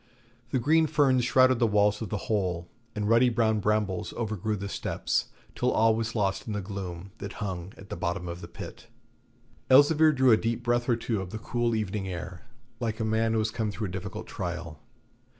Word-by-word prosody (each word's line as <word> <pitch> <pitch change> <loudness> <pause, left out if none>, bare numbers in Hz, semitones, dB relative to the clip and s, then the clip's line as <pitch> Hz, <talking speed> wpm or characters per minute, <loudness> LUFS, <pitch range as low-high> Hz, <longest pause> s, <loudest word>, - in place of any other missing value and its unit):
The 130 - 0
green 160 +6 +3
ferns 140 -5 +3
shrouded 130 -1 +4
the 120 - +4
walls 105 0 +2
of 110 - -4
the 105 - -4
hole, 90 -5 -1 0.3
and 105 -1 -1
ruddy 115 +3 +5
brown 110 -2 +2
brambles 105 -3 0
overgrew 110 -2 -2
the 100 0 -5
steps, - - -1 0.3
till - - 0
all 110 0 +4
was 115 +1 -3
lost 100 -1 0
in 110 - -3
the 105 - -1
gloom 95 -2 -6
that - - -6
hung 95 -4 -5
at 100 - -13
the - - -4
bottom 90 +1 -2
of 85 +1 -6
the 85 - -7
pit. 85 - -10 0.8
Elzevir 150 +4 +6
drew 130 -3 +4
a 110 - +7
deep 115 +2 -2
breath 120 +1 +1
or 120 - +4
two 115 -3 -2
of 95 - -6
the 110 - -5
cool 120 +1 -1
evening 105 -2 -2
air, 90 -1 -7 0.3
like 115 -2 -2
a 110 - 0
man 110 +1 +1
who - - +1
has 110 0 0
come 110 -2 -2
through 105 -1 -4
a - - -7
difficult 95 0 -6
trial. 85 -3 -5
110 Hz, 205 wpm, -28 LUFS, 95-120 Hz, 0.8 s, a